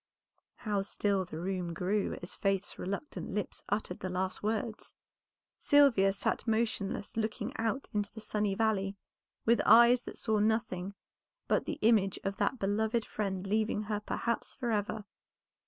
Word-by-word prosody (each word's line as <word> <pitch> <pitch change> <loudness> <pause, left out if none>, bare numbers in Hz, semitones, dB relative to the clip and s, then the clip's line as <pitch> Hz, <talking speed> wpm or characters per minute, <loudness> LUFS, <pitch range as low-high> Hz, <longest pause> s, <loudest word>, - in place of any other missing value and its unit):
How 205 -3 -1
still 195 -1 0
the 165 -3 -8
room 180 -1 -2
grew 195 +4 0
as 175 - -4
Faith's 195 0 -1
reluctant 200 - -4
lips 210 - -3
uttered 205 -3 -2
the 185 - -3
last 185 +1 -2
words! 215 +1 -2 0.6
Sylvia 270 -10 +5
sat 200 +4 -1
motionless 220 -3 -1
looking 220 -1 -2
out 230 +4 -1
into 205 -1 -1
the 220 - -9
sunny 210 -2 -1
valley, 200 -2 +1 0.5
with 235 +1 +4
eyes 235 +1 +7
that - - -9
saw 220 -2 +1
nothing 205 -3 0 0.5
but - - +2
the 310 - -3
image 210 -4 +4
of 195 0 -2
that 265 - +1
beloved 220 +2 0
friend 195 -3 -3
leaving 215 +1 0
her 210 0 -2
perhaps 235 +2 -2
forever. 220 -4 -1
210 Hz, 145 wpm, -32 LUFS, 195-220 Hz, 0.6 s, eyes